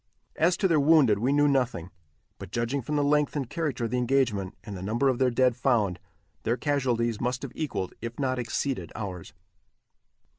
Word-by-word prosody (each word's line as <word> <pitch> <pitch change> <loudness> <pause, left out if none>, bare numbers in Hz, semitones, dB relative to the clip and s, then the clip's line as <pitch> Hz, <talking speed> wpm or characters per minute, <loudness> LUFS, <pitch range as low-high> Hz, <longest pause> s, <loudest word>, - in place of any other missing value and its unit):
As 170 +2 +2
to 195 - +2
their 165 -4 +3
wounded 140 -8 +5
we 125 +5 +1
knew 145 +1 +4
nothing, 125 - 0 0.5
but - - -8
judging 120 +5 -1
from 150 +5 -3
the 145 - +2
length 150 0 +2
and 140 -4 -2
character 140 -4 -2
of 115 - -4
the 125 - +1
engagement, 120 -6 0
and 105 - -7
the 90 - -7
number 115 +8 +1
of 125 - 0
their 130 -1 +4
dead 125 0 +2
found, 115 -8 +1 0.4
their 115 +2 0
casualties 120 -6 0
must 125 +2 -2
have 135 - -5
equalled, 130 - -3
if 115 0 -6
not 130 -2 -1
exceeded 120 - -2
ours. 95 -5 -6
125 Hz, 190 wpm, -27 LUFS, 115-140 Hz, 0.5 s, wounded